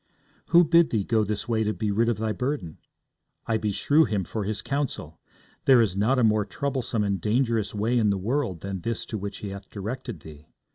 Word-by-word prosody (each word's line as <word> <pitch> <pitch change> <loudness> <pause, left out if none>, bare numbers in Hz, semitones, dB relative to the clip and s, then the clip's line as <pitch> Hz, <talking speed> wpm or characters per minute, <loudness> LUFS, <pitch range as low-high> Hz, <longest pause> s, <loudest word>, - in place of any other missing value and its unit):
'Who 175 0 +6
bid 170 0 +4
thee 110 -4 0
go 110 +2 +2
this 105 0 -3
way 110 -2 +1
to 105 0 -1
be 105 -2 -1
rid 115 +3 +2
of 115 - 0
thy 110 0 -1
burden? 125 - -3 0.7
I 115 - +1
beshrew 110 +9 +2
him 105 -4 -1
for 105 +4 -4
his 105 +1 -3
counsel. 135 - -3 0.5
There 130 -3 +7
is 105 -5 +2
not 110 +7 +2
a 125 - +3
more 110 -1 +3
troublesome 130 -2 -2
and 100 -3 -1
dangerous 115 0 0
way 115 +4 +1
in 110 -2 +3
the 100 - +1
world 100 - -2
than 95 -2 -5
this 115 +2 -2
is - - -7
to 110 - -5
which 100 +1 -5
he - - -4
hath 100 0 -9
directed 110 - -6
thee. 75 0 -13
110 Hz, 220 wpm, -26 LUFS, 100-125 Hz, 0.7 s, There